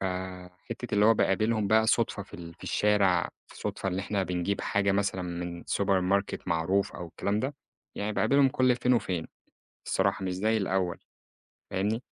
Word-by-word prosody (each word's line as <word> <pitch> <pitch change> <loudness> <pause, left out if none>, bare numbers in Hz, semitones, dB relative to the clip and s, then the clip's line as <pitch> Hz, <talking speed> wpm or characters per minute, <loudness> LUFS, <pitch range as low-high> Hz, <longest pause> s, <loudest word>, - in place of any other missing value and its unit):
فَحتّة 95 +5 -5
اللي 105 0 +4
هو 115 - +6
باقابلهم 110 +2 +2
بقى 110 +1 +4
صُدفة 115 -3 +1
في 95 - -15
ال 85 -1 -9
في - - -21
الشارع، 100 -4 +2 0.2
في - - -15
صُدفة 95 - -3
اللي 95 0 -1
إحنا 100 0 -1
بنجيب 90 +2 -1
حاجة 100 -1 +1
مثلًا 100 -2 0
من 85 -1 -5
سوبر 100 -1 +2
ماركت 100 +1 0
معروف 85 +4 +1
أو 90 - -6
الكلام 100 +5 -1
ده، 135 +2 -2 0.4
يعني 105 +1 -2
باقابلهم 135 +6 +4
كل 130 -1 +3
فين 125 0 +2
وفين 90 -8 -1 0.6
الصراحة - - +1
مش 95 - -1
زي 110 +4 +1
الأول 95 -3 0 0.7
فاهمني؟ 105 +5 -1
100 Hz, 170 wpm, -28 LUFS, 90-110 Hz, 0.7 s, هو